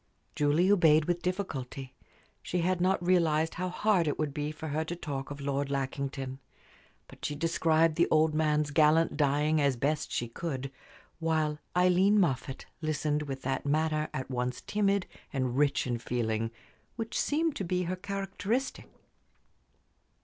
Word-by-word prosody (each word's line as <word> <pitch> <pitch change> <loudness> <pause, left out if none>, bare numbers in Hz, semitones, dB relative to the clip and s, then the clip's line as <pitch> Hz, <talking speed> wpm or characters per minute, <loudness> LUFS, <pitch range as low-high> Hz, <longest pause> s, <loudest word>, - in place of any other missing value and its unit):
Julie 150 +6 +3
obeyed 160 -6 +5
with 175 +1 -1
difficulty. 140 -8 -4 0.5
She 180 - -2
had 180 +1 +1
not 185 -1 +2
realized 160 -3 +3
how 185 +1 -3
hard 185 -2 +2
it 145 - 0
would 150 -2 -2
be 150 +1 -2
for 155 0 -7
her 155 +2 0
to 170 +2 -5
talk 140 -5 -5
of 145 0 -7
Lord 140 0 -1
Lackington. 135 -1 -3 0.7
But - - -16
she 150 - -2
described 165 0 +2
the 170 - +4
old 155 0 +3
man's 150 -1 +1
gallant 155 +1 +4
dying 150 +1 +2
as 140 -2 +2
best 150 +5 -1
she 120 - -1
could; 135 +1 -4 0.5
while 155 -2 0 0.2
Aileen 185 +3 +4
Moffatt 135 -6 -1 0.2
listened 150 -1 0
with 135 -3 -5
that 135 0 -1
manner 155 +1 0
at 130 - -4
once 125 0 -2
timid 200 -2 +1 0.3
and 130 -3 -1
rich 140 0 +2
in 120 -2 -2
feeling 115 -2 -1 0.5
which 225 -1 -3
seemed 315 +1 0
to - - -2
be 180 0 0
her 180 +1 -2
characteristic. 200 +7 -3
155 Hz, 155 wpm, -30 LUFS, 140-175 Hz, 0.7 s, obeyed